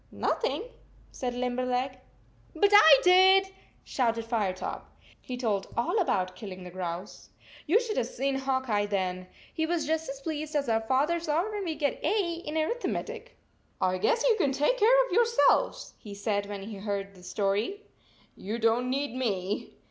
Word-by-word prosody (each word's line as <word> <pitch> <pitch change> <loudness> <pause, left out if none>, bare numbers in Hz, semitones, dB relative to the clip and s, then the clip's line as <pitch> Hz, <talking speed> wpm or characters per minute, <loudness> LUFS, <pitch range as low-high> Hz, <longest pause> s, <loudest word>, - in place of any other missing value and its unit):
" - - -33
Nothing," 480 - -1 0.5
said 245 -2 -4
Limberleg. 250 +1 -1
4< 255 - -21 0.6
But 405 - +6
I 320 -9 +9
did," 380 +1 +6 0.3
shouted 230 -3 -1
Firetop. 210 -6 -3 0.3
He 250 - -6
told 210 -6 -1
all 345 - +1
about 185 - 0
killing 190 -4 -8
the 180 - -9
grouse. 180 +1 -6 0.4
You 375 +9 +5
should 465 -3 -4
have 235 - 0
seen 270 +2 -2
Hawk 265 -1 -1
Eye 205 -2 +1
then! 185 -2 -2 0.3
He 320 0 -1
was 335 -2 -1
just 320 0 -1
as 270 0 -6
pleased 305 +1 -5
as 285 -2 0
our 225 -1 +1
fathers 295 +9 0
are 340 +8 +1
when 410 -2 -4
we 325 -2 -2
get 290 -1 -2
A 390 -6 +1
in 305 +1 -4
arithmetic! 470 +11 -3 0.2
" - - -40
I 185 0 -2
guess 455 - +2
you 465 - +4
can 275 - +2
take 295 - +1
care - - +5
of - - -10
your 475 - +5
selves," 470 +1 +2
he 205 -3 -9
said, 200 0 -1
when 200 -1 -6
he 215 +2 -7
had 195 - -10
heard 200 -1 -3
the 185 - -16
story. 205 - -2 0.5
"You 215 +4 -5
don 230 +2 +2
t - - -3
need 275 -1 -2
me." 205 -6 -3
255 Hz, 185 wpm, -28 LUFS, 205-330 Hz, 0.6 s, I